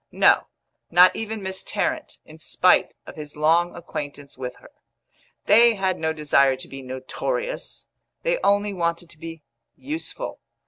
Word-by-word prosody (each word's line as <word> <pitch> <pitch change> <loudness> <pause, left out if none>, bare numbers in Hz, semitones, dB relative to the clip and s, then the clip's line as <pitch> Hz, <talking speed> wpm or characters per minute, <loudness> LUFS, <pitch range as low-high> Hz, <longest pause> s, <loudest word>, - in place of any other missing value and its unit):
No, - - +4 0.4
not 180 +2 +7
even 220 -2 -4
Miss 190 0 -3
Tarrant, 320 -1 -2
in 155 +1 -14
spite 180 +3 +3
of - - -10
his 150 -1 -8
long 165 +3 +2
acquaintance 145 -4 -7
with 125 -1 -6
her. - - -17 0.7
They 230 +2 +6
had 190 -2 -1
no 160 0 0
desire 140 -3 +3
to 130 - -9
be 135 0 -8
notorious; 470 - -4 0.4
they - - +1
only 205 0 +2
wanted 170 -1 -2
to 155 - -16
be 165 -1 -8 0.3
useful. 320 - -5
170 Hz, 145 wpm, -24 LUFS, 150-210 Hz, 0.7 s, not